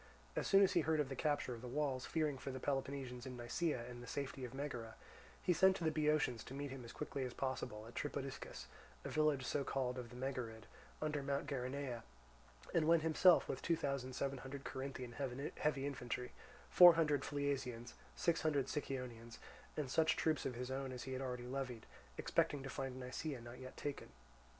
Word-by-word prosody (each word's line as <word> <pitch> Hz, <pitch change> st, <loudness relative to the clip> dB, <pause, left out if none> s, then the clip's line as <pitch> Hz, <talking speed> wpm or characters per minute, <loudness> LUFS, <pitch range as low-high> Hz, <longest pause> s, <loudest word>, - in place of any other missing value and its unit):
As -, -, 0 dB
soon 195 Hz, 0 st, +7 dB
as 190 Hz, -, +4 dB
he 170 Hz, -, +5 dB
heard 160 Hz, +1 st, +2 dB
of 145 Hz, -3 st, +1 dB
the 135 Hz, -, -3 dB
capture 145 Hz, -2 st, 0 dB
of 115 Hz, -, -7 dB
the 125 Hz, -, -6 dB
walls, 135 Hz, -1 st, -1 dB
fearing 150 Hz, -4 st, 0 dB
for -, -, -5 dB
the 130 Hz, 0 st, -4 dB
Peloponnesians 135 Hz, -2 st, -2 dB
in 125 Hz, -1 st, -6 dB
Nisaea 120 Hz, +1 st, -1 dB
and 120 Hz, -1 st, -8 dB
the 125 Hz, -, -9 dB
safety 140 Hz, -1 st, -3 dB
of 125 Hz, -, -4 dB
Megara, 130 Hz, -5 st, -4 dB, 0.5 s
he 180 Hz, -, +4 dB
sent 190 Hz, +2 st, +6 dB
to 175 Hz, -, -4 dB
the 160 Hz, -, +3 dB
Boeotians 150 Hz, -6 st, +2 dB
to 135 Hz, -, -7 dB
meet 140 Hz, -1 st, -3 dB
him 135 Hz, -2 st, -6 dB
as 115 Hz, -, -8 dB
quickly 140 Hz, -2 st, -3 dB
as 125 Hz, -1 st, -4 dB
possible 120 Hz, -5 st, -2 dB
at 120 Hz, -, -11 dB
Tripodiscus, 140 Hz, -1 st, -4 dB, 0.4 s
a -, -, -2 dB
village 150 Hz, -4 st, +2 dB
so 140 Hz, +2 st, 0 dB
called 130 Hz, -2 st, -1 dB
of 120 Hz, -2 st, -6 dB
the 120 Hz, -, -11 dB
Megarid, 125 Hz, -4 st, -3 dB, 0.4 s
under 150 Hz, -1 st, 0 dB
Mount 140 Hz, +1 st, -1 dB
Geraneia, 130 Hz, -2 st, -2 dB, 0.7 s
and 155 Hz, -2 st, +3 dB
went 165 Hz, -1 st, +6 dB
himself, 165 Hz, +2 st, +6 dB
with -, -, -3 dB
two 170 Hz, -, +2 dB
thousand 135 Hz, -4 st, -2 dB
seven 135 Hz, +1 st, -1 dB
hundred 135 Hz, +2 st, -6 dB
Corinthian 130 Hz, -2 st, -4 dB
heavy 135 Hz, +2 st, -1 dB
infantry, 125 Hz, -3 st, -3 dB, 0.4 s
four 175 Hz, -2 st, +11 dB
hundred 150 Hz, -4 st, +3 dB
Phliasians, 135 Hz, -5 st, -2 dB, 0.2 s
six 170 Hz, -2 st, +2 dB
hundred 145 Hz, -4 st, +2 dB
Sicyonians, 125 Hz, -5 st, -4 dB, 0.4 s
and 150 Hz, -3 st, 0 dB
such 160 Hz, +2 st, +4 dB
troops 155 Hz, -4 st, +1 dB
of 125 Hz, -, -4 dB
his 125 Hz, +2 st, -4 dB
own 135 Hz, 0 st, -2 dB
as 125 Hz, -1 st, -5 dB
he 130 Hz, -, -4 dB
had 130 Hz, -, -2 dB
already 125 Hz, -2 st, -3 dB
levied, 125 Hz, -3 st, -3 dB, 0.3 s
expecting 145 Hz, -2 st, +1 dB
to 135 Hz, -, -5 dB
find 135 Hz, -1 st, -3 dB
Nisaea 130 Hz, +2 st, -3 dB
not 120 Hz, +1 st, -9 dB
yet 130 Hz, 0 st, -9 dB
taken. 145 Hz, -1 st, -4 dB
135 Hz, 200 wpm, -39 LUFS, 125-145 Hz, 0.7 s, four